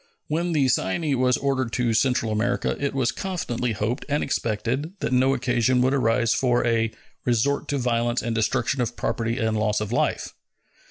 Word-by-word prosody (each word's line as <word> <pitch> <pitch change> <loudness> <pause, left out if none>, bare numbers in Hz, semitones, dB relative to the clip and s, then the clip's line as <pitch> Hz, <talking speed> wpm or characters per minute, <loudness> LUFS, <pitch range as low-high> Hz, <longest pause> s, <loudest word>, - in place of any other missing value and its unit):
When 170 +3 -1
the 140 -4 +3
Cyane 135 - 0
was 125 -1 +3
ordered 130 -3 -1
to 120 -3 +1
Central 115 -1 +1
America, 110 +1 0
it 140 -1 -1
was 125 -3 +1
confidently 125 -11 -3
hoped 110 +6 -2
and 145 +1 +1
expected 125 - -2
that 125 - -2
no 130 +2 +3
occasion 125 0 +1
would 130 +1 +2
arise 115 -3 +2
for 120 -2 +1
"a 115 -1 +1 0.3
resort 125 +4 +1
to 145 - -1
violence 120 -1 0
and 115 - -1
destruction 115 +3 0
of 120 0 -2
property 115 +1 -1
and 110 -3 0
loss 105 -1 +1
of 105 0 -4
life." 120 - 0
125 Hz, 175 wpm, -24 LUFS, 115-135 Hz, 0.3 s, the